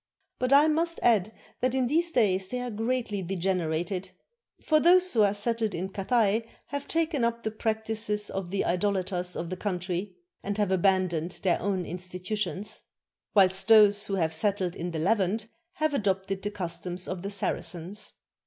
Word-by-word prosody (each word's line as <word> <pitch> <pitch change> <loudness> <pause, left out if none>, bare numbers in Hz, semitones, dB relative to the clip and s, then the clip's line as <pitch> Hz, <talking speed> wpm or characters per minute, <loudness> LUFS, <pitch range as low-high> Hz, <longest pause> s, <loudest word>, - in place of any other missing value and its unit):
But 255 +1 0
I 285 +2 +7
must 330 +2 +1
add 215 -3 +3 0.3
that 255 +1 0
in 260 -1 +2
these 330 +7 +1
days 195 - +2
they 250 +5 -3
are 245 -1 -4
greatly 225 -2 -2
degenerated; 180 0 -2 0.5
for 310 -1 +3
those 365 +3 +5
who 225 - +4
are 205 -1 +5
settled 220 +1 -1
in 185 +3 -3
Cathay 215 +2 +1 0.3
have 285 0 -4
taken 320 -5 0
up 235 0 0
the 220 - -2
practices 220 -1 -2
of 190 -2 -4
the 195 +1 -1
idolaters 180 -1 -1
of 170 +1 -4
the 185 - -3
country, 185 0 -3 0.3
and 200 +1 -3
have 205 -2 +1
aban 190 0 +3
doned 170 +1 -4
their 185 -3 +2
own 190 -2 -1
institutions; 185 +3 -3 0.5
whilst 190 -1 +5
those 210 -2 +6
who 195 - -1
have 160 -4 0
settled 185 +1 0
in 175 - -4
the 165 - -4
Levant 200 +4 +1 0.3
have 310 -1 0
adopted 195 -4 -1
the 205 - -2
customs 180 -2 -4
of 185 -1 -4
the 200 - -4
Saracens. 195 0 -2
200 Hz, 170 wpm, -28 LUFS, 185-225 Hz, 0.5 s, I